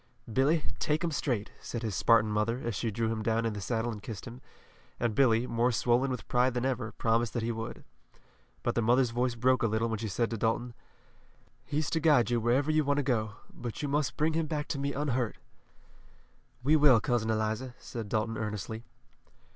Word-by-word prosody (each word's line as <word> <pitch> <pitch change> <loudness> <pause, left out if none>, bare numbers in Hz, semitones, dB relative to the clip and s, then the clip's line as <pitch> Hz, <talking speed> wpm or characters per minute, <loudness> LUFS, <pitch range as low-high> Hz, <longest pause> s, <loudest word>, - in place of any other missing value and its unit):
"Billy, 150 +5 +3 0.2
take 150 +2 0
'em 170 - 0
straight," 120 -8 -1
said 120 -1 -5
his 110 -4 -2
Spartan 110 +1 +4
mother, 105 +3 0
as 120 - -1
she 115 +4 -1
drew 110 +1 -1
him 110 -1 -2
down 115 +1 +1
in 115 - 0
the 105 - -5
saddle 115 +3 -1
and 105 -2 -7
kissed 105 -2 -7
him, 120 +2 -9 0.6
and 120 -2 0
Billy, 120 -2 +4
more 120 +1 +1
swollen 120 +3 +2
with 125 - -4
pride 125 +1 +2
than 125 +1 0
ever, 120 -4 -1
promised 115 0 +1
that 120 - -1
he 115 - 0
would. 115 0 -6 0.8
But - - +1
the 120 - +1
mother's 120 +2 +3
voice 120 0 0
broke 130 +2 +2
a 115 - +3
little 110 +2 0
when 110 -2 -2
she 110 - -3
said 115 +4 -1
to 115 - -2
Dalton: 115 +2 0 0.9
"He's 150 +1 -2
to 165 - +1
guide 145 -8 +4
you 120 - +2
wherever 130 +6 +2
you 155 0 +3
want 145 0 +1
to 145 - +1
go, 110 -5 0 0.2
but 120 +3 -6
you - - 0
must 145 0 0
bring 155 +1 +2
him 160 0 0
back 150 -1 -2
to 140 - -2
me 140 0 -1
unhurt." 130 -4 -1 1.3
"We 150 +4 +4
will, 145 -6 +6
Cousin 120 -4 0
Eliza," 110 +3 -1
said 115 -4 -7
Dalton 110 +1 -1
earnestly. 110 +1 -4
120 Hz, 210 wpm, -30 LUFS, 110-135 Hz, 1.3 s, will